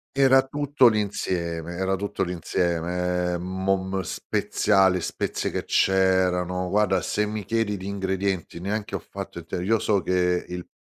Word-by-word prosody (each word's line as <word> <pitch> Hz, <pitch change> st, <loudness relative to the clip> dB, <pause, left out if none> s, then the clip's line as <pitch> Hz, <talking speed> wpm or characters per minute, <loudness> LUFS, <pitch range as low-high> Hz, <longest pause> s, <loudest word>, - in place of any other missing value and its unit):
Era 135 Hz, -1 st, +6 dB
tutto 145 Hz, -2 st, +3 dB
l'insieme 85 Hz, -6 st, -1 dB
era 95 Hz, +1 st, 0 dB
tutto 100 Hz, +1 st, -2 dB
l'insieme, 90 Hz, 0 st, -1 dB
ehm, 85 Hz, -, -4 dB
mom 95 Hz, +1 st, -1 dB
speziali, 95 Hz, +1 st, +1 dB
spezie -, -, -2 dB
che -, -, -3 dB
c'erano. 90 Hz, -1 st, +2 dB
Guarda, 100 Hz, -2 st, +2 dB
se 105 Hz, 0 st, 0 dB
mi 105 Hz, -2 st, -4 dB
chiedi 110 Hz, -2 st, 0 dB
di 95 Hz, -, -8 dB
ingredienti 95 Hz, -3 st, -2 dB
neanche 105 Hz, +3 st, -3 dB
ho -, -, -2 dB
fatto -, -, -8 dB
il -, -, -7 dB
t -, -, -30 dB
io 110 Hz, +5 st, +2 dB
so 100 Hz, -2 st, +1 dB
che 90 Hz, 0 st, +1 dB
il 90 Hz, 0 st, -6 dB
95 Hz, 150 wpm, -25 LUFS, 90-105 Hz, -, Era